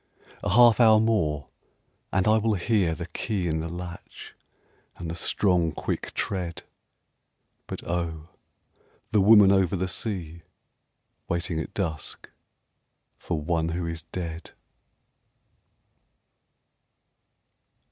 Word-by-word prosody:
A - - -2
half 120 +3 +6
hour 110 -2 +7
more 80 - 0 0.6
and 95 +2 +1
I 110 +1 +5
will 110 0 +1
hear 95 -3 +1
The 85 - -5
key 95 0 -3
in 80 -1 -1
the 80 +1 -4
latch 85 0 -9 0.6
and 85 -2 -5
the - - -4
strong, 85 -1 +2
quick - - -4
tread 90 -4 -3 1.0
But - - -6
oh, 85 -2 -3 0.8
the 105 -3 +4
woman 105 -1 +7
over 95 -2 +3
the 95 0 -1
sea 85 -4 -4 0.9
Waiting 85 -1 -1
at 80 - -6
dusk 80 -6 -4 0.9
for 85 - -3
one 80 +1 -1
who 85 +1 -3
is 85 -1 -5
dead! 85 -2 -6
90 Hz, 110 wpm, -26 LUFS, 80-100 Hz, 1.0 s, hour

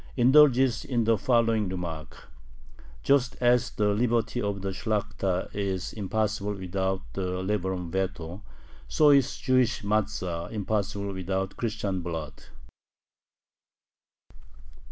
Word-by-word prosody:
indulges 130 -1 +5
in 120 -3 0
the 115 +1 +3
following 115 -4 +2
remark: 85 -4 -6 0.8
"Just 135 -2 +2
as 120 -1 +3
the 105 -1 0
liberty 115 +2 +1
of 100 -2 -3
the 100 - -1
Shlakhta 100 -2 -2
is 95 -3 -3
impossible 105 0 -1
without 95 0 -2
the 90 -1 -3
liberum 95 -3 -2
veto, 90 -1 -3 0.5
so 150 -1 +5
is 140 -2 +3
the - - -16
Jewish 130 -4 +2
matza 100 -5 -1
impossible 100 -1 -2
without 95 +1 -3
Christian 105 -5 -2
blood." 80 -4 -5
100 Hz, 110 wpm, -27 LUFS, 95-115 Hz, 0.8 s, indulges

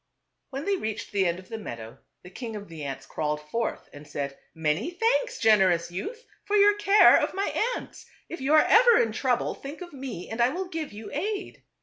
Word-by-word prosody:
When 275 +2 -5
they 400 -1 +1
reached 220 - -5
the 195 -2 +2
end 170 0 -1
of 185 0 -12
the 225 - -5
meadow, 115 - -8 0.2
the 180 - -12
king 225 +2 -6
of 205 -1 -7
the 165 -3 -8
ants 135 -1 -6
crawled 150 +1 -2
forth 230 0 -2
and 145 +1 -12
said, 140 -1 -4
" - - -44
Many 155 - +1
thanks, 480 +6 0
generous 185 -6 +3
youth, 450 - -6 0.2
for 415 - -1
your 410 0 +6
care 415 0 +7
of - - -2
my 395 +1 -1 0.2
ants. - - -10 0.2
If 340 - -7
you 280 +4 +3
are 310 - +6
ever 475 +1 +6
in 225 - +2
trouble, 245 +2 0
think 280 +3 -9
of 350 -2 -9
me 260 -10 -6
and 225 +2 -3
I 240 - +5
will 360 +6 -4
give 320 -3 -4
you 210 +1 -9
aid." 395 +7 -3
235 Hz, 220 wpm, -26 LUFS, -, 0.2 s, care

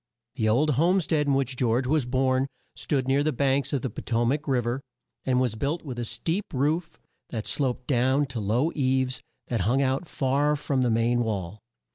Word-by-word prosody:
The 110 -5 0
old 145 +8 +3
home 180 +3 +4
stead 155 -3 0
in 140 - +3
which 135 -1 0
George 125 0 +1
was 140 -1 +1
born 130 +1 +1 0.3
stood 135 -3 -1
near 135 +1 +3
the 155 +1 +1
banks 140 0 +1
of 140 -4 -1
the 130 - -1
Po - - -7
to 120 0 0
mac 145 +5 0
Riv 125 -4 +1
er, 120 +3 -1 0.4
and 125 -1 +2
was 125 -4 +1
built 140 +9 -2
with 130 -5 -6
a 120 - -2
steep 165 - -2
roof 155 +6 0 0.3
that 110 -3 -4
sloped 130 -3 -1
down 130 +2 +2
to 125 -3 -4
low 115 +10 +1
eaves 130 -2 0 0.3
that 115 -4 0
hung 125 +8 +2
out 135 +5 0
far 140 +2 +1
from 140 -2 -1
the 125 - +2
main 115 +2 +2
wall. 105 -4 -2
130 Hz, 205 wpm, -26 LUFS, 120-145 Hz, 0.4 s, home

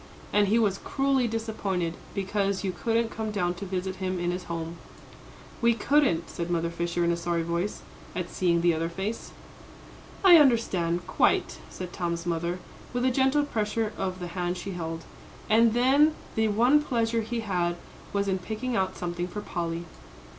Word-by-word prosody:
And 205 -1 +4
he 215 +4 +3
was 205 -4 +2
cruelly 270 -2 +1
disappointed 210 -6 -2 0.2
because 195 0 0
you 190 - 0
couldn't 230 +5 0
come 220 -1 -3
down 180 -4 0
to 180 +3 -7
visit 185 0 -3
him 185 -1 -2
in 175 0 0
his 180 0 -4
home." 165 0 -4 0.8
"We 235 -1 +4
couldn't," 255 - +2
said 170 0 -4
Mother 170 -1 0
Fisher, 170 +1 -1
in 170 - +3
a - - +1
sorry 170 0 -1
voice, 170 +4 -2 0.3
at 180 -1 -2
seeing 170 -2 +1
the 170 0 +4
other 165 +1 -1
face. 195 +6 -4 0.9
"I 355 -3 +10
understand 185 - +3
quite," - - +1
said 180 -1 -7
Tom's 170 -2 -2
mother, 170 +1 -1 0.4
with 245 +1 0
a 260 - +4
gentle 270 +3 +3
pressure 220 -4 -1
of 185 -1 -3
the 180 - -4
hand 180 0 -2
she 195 +2 -5
held. 165 -2 -4 0.4
"And 225 +1 +4
then 280 +5 +5 0.2
the 220 0 +2
one 240 +8 +4
pleasure 230 -4 0
he 230 +1 -3
had 175 -5 0 0.4
was 200 0 0
in 190 -1 +1
picking 220 +6 -3
out 190 -2 0
something 175 0 -3
for 210 +3 -5
Polly." 170 -3 -3
190 Hz, 175 wpm, -27 LUFS, 175-225 Hz, 0.9 s, I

